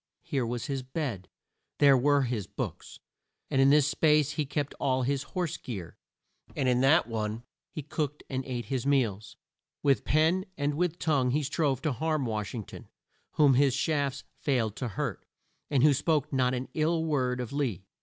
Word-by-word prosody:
Here 130 -4 -1
was 120 0 -3
his 135 -2 -2
bed, 130 - -4 0.5
there 140 -2 +6
were 140 +2 +3
his 115 -6 -2
books; - - -6 0.5
in 135 0 +4
this 145 -1 +5
space 150 -1 +3
he 150 -3 -2
kept 145 0 -2
all 130 -1 +1
his 135 +1 0 0.2
horse 175 -4 -1
gear, 95 -9 -7 0.6
and 130 - 0
in 125 0 +3
that 145 +6 +5
one 110 0 -3 0.3
he 155 - -6
cooked 150 0 -3
and 130 -1 -3
ate 120 -3 -4
his 130 +2 -2
meals. 120 -8 0 0.5
With 140 -2 +3
pen 160 +5 +2
and 145 0 0
with 170 +2 -1
tongue 140 -7 +1
he 145 +4 +1
strove 145 -1 0
to 155 - +1
harm 155 +2 -1
Wash 110 -1 -3
ing 110 - -4
ton, - - -12 0.5
whom 145 -3 +5
his 135 0 +3
shafts 140 -1 -1 0.2
failed 115 -7 0
to 125 - -3
hurt, 105 - -4 0.5
and 135 -3 +2
who 150 -1 +6
spoke 150 +1 0
not 130 -1 +2
an 125 +1 -4
ill 160 +1 +1
word 130 -5 0
of 125 +1 -5
Lee. 120 - -2
135 Hz, 180 wpm, -29 LUFS, 125-150 Hz, 0.6 s, there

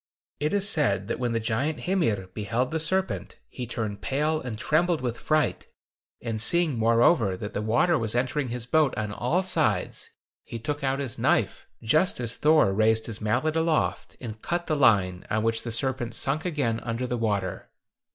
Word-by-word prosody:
It 150 +1 0
is 200 -1 +2
said 100 - +1
that - - -2
when 120 -2 -1
the 115 - +1
giant 125 +7 -1
Hymir 135 - 0
beheld 115 +5 -2
the 160 - -1
serpent, 190 +4 0
he 125 -2 -7
turned 105 -3 -4
pale 150 +7 0
and 120 -4 -5
trembled 165 +7 +1
with 120 -2 -3
fright 155 -1 0 0.6
and 115 -2 -2
seeing, 170 +3 +2
moreover, 115 - +3
that 105 +2 -6
the - - -2
water 120 +10 +2
was 110 0 -2
entering 130 +3 0
his 120 -1 -4
boat 150 +1 +2
on 105 -1 -2
all 125 - 0
sides, 185 - 0 0.3
he 115 - -7
took 145 +6 -4
out 135 0 +1
his 135 -5 -4
knife, - - +1 0.2
just 155 +11 +2
as 120 -1 -4
Thor 150 -10 +4
raised 110 +2 +2
his 115 -1 -6
mallet 120 +9 0
aloft, 160 -1 0
and 110 -3 -8
cut 175 0 -2
the 155 - 0
line, 95 -10 +3
on 110 +1 0
which 115 0 0
the 120 - -6
serpent 120 -1 -1
sunk 145 +6 0
again 140 -10 -1
under 120 +1 -3
the 125 - -2
water. 100 -5 -2
120 Hz, 185 wpm, -26 LUFS, 110-155 Hz, 0.6 s, Thor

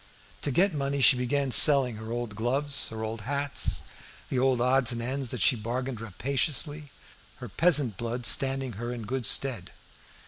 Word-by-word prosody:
To - - +1
get 180 +7 +1
money 140 -1 -3
she 130 - +6
began 130 +2 -2
selling 135 -5 +6
her 110 +1 -9
old 120 -3 -5
gloves, 135 +6 0
her 110 0 -7
old 110 0 -6
hats, 140 +5 0 0.5
the 130 - -2
old 130 -1 +1
odds 130 +1 +2
and 120 - -4
ends, 130 +1 -4
and - - -6
she - - +3
bargained 120 +2 -5
rapaciously, 140 - -3 0.5
her 125 - -10
peasant 140 - +3
blood 120 +1 -5
standing 135 0 +2
her 120 0 -5
in 120 -2 -7
good 125 +1 -3
stead. 120 -10 0
130 Hz, 170 wpm, -26 LUFS, 120-140 Hz, 0.5 s, she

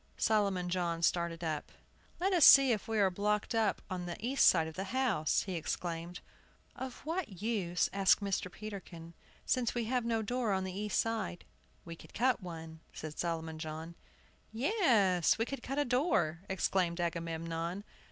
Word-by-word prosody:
Solomon 200 -4 +1
John 175 -2 -1
started 170 0 0
up. 155 -2 -3 0.5
"Let 380 +2 +1
us 345 -4 +4
see 275 -2 +9
if 215 -3 -1
we 225 -1 -1
are 195 -2 +4
blocked 210 +4 -1
up 220 -3 +1
on 180 -2 -4
the 175 - -5
east 260 +5 +3
side 165 -3 +5
of 160 - -7
the 190 +4 -4
house!" 220 - +1
he 190 - -5
exclaimed. 170 +1 -4 0.5
"Of 260 0 -7
what 305 - -4
use," 190 -7 0
asked 195 -1 +4
Mr. 195 -3 -2
Peterkin, 185 -5 -9 0.3
"since 250 -3 0
we 240 - 0
have 250 +1 0
no 225 -1 0
door 240 -1 -1
on 190 0 0
the 185 -1 -4
east 210 0 -1
side?" 225 -6 -2 0.4
"We 165 -1 -7
could - - -16
cut 250 -1 +2
one," 165 -2 -8
said 155 -1 -8
Solomon 160 -2 -3
John. 160 +1 -6 0.6
"Yes, 225 - +3
we 225 - 0
could 275 0 -6
cut 270 +3 -4
a 290 - +2
door," 235 - +1
exclaimed 185 -2 0
Agamemnon. 165 +1 -3
190 Hz, 170 wpm, -33 LUFS, 170-230 Hz, 0.6 s, see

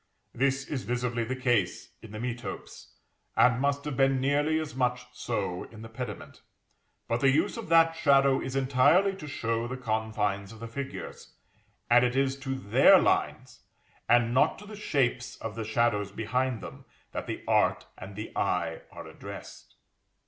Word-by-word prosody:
This 135 +1 0
is 140 -4 -3
visibly 120 -1 -2
the 125 +3 -3
case 120 -8 0
in 110 - -12
the 110 - -7
metopes, 120 0 -6 0.5
and 125 0 +4
must 140 0 0
have 150 -3 -3
been 135 0 +3
nearly 145 +4 +1
as 155 -1 -5
much 125 -1 -1
so 100 -6 -3
in 110 -1 -12
the 115 - -9
pediment. 125 +2 -7 0.7
But 115 - 0
the 135 - +5
use 145 +4 +2
of 230 -7 -7
that 165 0 +5
shadow 140 -4 +4
is 130 0 -5
entirely 140 +9 +4
to 150 - -8
show 115 -4 -2
the 130 +1 -5
confines 110 -4 -2
of 110 - -12
the 115 - -6
figures; 135 +4 -7 0.5
and 120 +1 +5
it 125 0 +1
is 135 0 +1
to 135 -1 -3
their 105 -6 +6
lines, - - 0 0.5
and 120 -1 +4
not 130 - +3
to 210 - -12
the 215 +1 -9
shapes 130 -11 -1
of 115 - -6
the 115 +1 -4
shadows 110 -2 0
behind 120 +3 -1
them, - - -10 0.3
that - - -5
the - - -5
art - - +2
and 95 +1 -10
the 110 +2 -7
eye - - -1
are - - -9
addressed. - - -11
125 Hz, 170 wpm, -28 LUFS, 115-140 Hz, 0.7 s, their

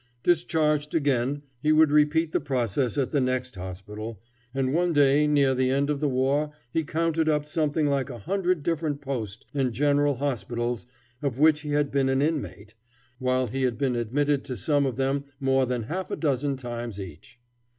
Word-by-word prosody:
Discharged 155 -3 +1
again 140 -1 +1 0.2
he 150 - +2
would 155 -1 +5
repeat 150 +2 +3
the - - +1
process 130 -2 -1
at 135 -3 0
the 145 - +2
next 130 0 -1
hospital, 100 +3 -7 0.3
and 135 0 -1
one 175 +1 +2
day 145 0 +4
near 140 -3 +3
the 130 0 +1
end 140 +2 +1
of 145 - -1
the 150 0 +1
war 135 +3 +1 0.2
he 160 - 0
counted 160 +1 0
up 150 -1 +1
something 150 0 0
like 140 -2 0
a 125 - -6
hundred 180 - -1
different 155 -3 -1
post 115 -7 -5
and 135 -3 0
general 145 +2 +2
hospitals 120 -4 -2 0.3
of 135 -4 -2
which 155 +1 +4
he 150 - -6
had 145 -1 +1
been 135 -1 +2
an 135 0 +2
inmate, 110 - -2 0.5
while 130 0 +1
he 130 +3 -3
had 125 -3 0
been 130 -2 0
admitted 140 +5 0
to 125 - -5
some 140 +7 +1
of 130 - -3
them 135 +1 0 0.2
more 135 -1 +2
than 125 -2 -1
half 180 - -4
a - - -2
dozen 140 -2 0
times 120 -4 -6
each. 95 - -10
140 Hz, 185 wpm, -26 LUFS, 125-150 Hz, 0.5 s, would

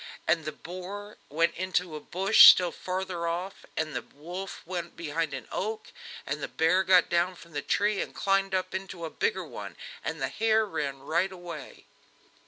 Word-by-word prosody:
And 160 -1 +2
the 155 - -2
boar 185 +6 -8
went 165 +3 +2
into 180 -2 -1
a - - -4
bush 190 +7 +8
still 180 -2 +5
farther 185 -2 -3
off, 180 +3 -4
and 155 -1 -1
the - - -1
wolf 175 +6 -8
went 175 -1 -5
behind 165 -1 -2
an 135 -4 -6
oak, 215 +2 -3 0.3
and - - -3
the - - -2
bear 165 +4 +3
got 185 -2 +5
down 175 +2 +1
from 170 0 -15
the 145 - -2
tree, 205 +4 +1
and - - -6
climbed 195 0 +1
up 185 - -1
into 190 -3 -5
a 160 - -6
bigger 460 +1 -1
one, - - -8 0.3
and - - -3
the - - -1
hare 220 0 +2
ran 140 -8 -3
right 170 +7 0
away. 175 -2 -9
180 Hz, 185 wpm, -28 LUFS, 165-190 Hz, 0.3 s, bush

